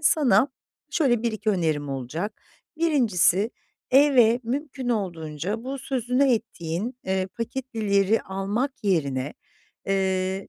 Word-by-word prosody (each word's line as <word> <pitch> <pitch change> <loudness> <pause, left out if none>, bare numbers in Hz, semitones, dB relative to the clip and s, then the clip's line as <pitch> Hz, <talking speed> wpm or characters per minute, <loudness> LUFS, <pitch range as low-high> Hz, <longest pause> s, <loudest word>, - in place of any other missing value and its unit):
sana 270 -4 +4 0.4
şöyle 245 -8 +2
1-2 220 -2 0
önerim 155 -7 0
olacak. 140 - -4 0.4
1'incisi 225 - +3 0.4
eve 255 -4 +5
mümkün 265 +1 -3
olduğunca 185 - -3
bu 270 +1 -4
sözünü 255 0 +1
ettiğin, 215 +2 -3
eee, 190 0 0
paketlileri 225 -3 0
almak 200 +8 -2
yerine, 140 -7 0 0.5
eee, 190 0 0
215 Hz, 95 wpm, -25 LUFS, 185-250 Hz, 0.5 s, eve